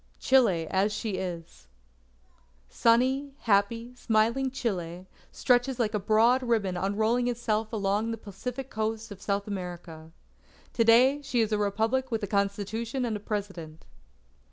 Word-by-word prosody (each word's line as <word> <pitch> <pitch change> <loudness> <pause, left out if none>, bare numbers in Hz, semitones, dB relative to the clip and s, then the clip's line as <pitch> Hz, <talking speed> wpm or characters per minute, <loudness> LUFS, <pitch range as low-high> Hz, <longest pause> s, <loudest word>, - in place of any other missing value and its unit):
CHILE 220 -11 +3
AS 195 +2 +2
SHE 210 -1 -3
IS 165 - -7 1.0
Sunny, 260 - +2
happy, 230 +3 +1
smiling 235 +2 +1
Chile, 185 -9 -4 0.3
stretches 245 0 +1
like 230 -3 0
a 210 - 0
broad 225 +5 +3
ribbon 220 -7 0
unrolling 215 +6 0
itself 225 -3 -1
along 210 0 0
the 225 - -3
Pacific 245 +6 -7
coast 220 0 -3
of 195 -1 -10
South 200 0 -1
America. 175 -5 -7 0.6
To 230 - +2
day 255 +5 +5
she 270 -4 -1
is 220 -1 0
a 210 - +1
Republic 225 +6 0
with 225 -3 -2
a - - -1
Constitution 210 +5 -1
and 225 -3 -2
a - - -4
President. 195 -7 -6
220 Hz, 140 wpm, -28 LUFS, 200-240 Hz, 1.0 s, day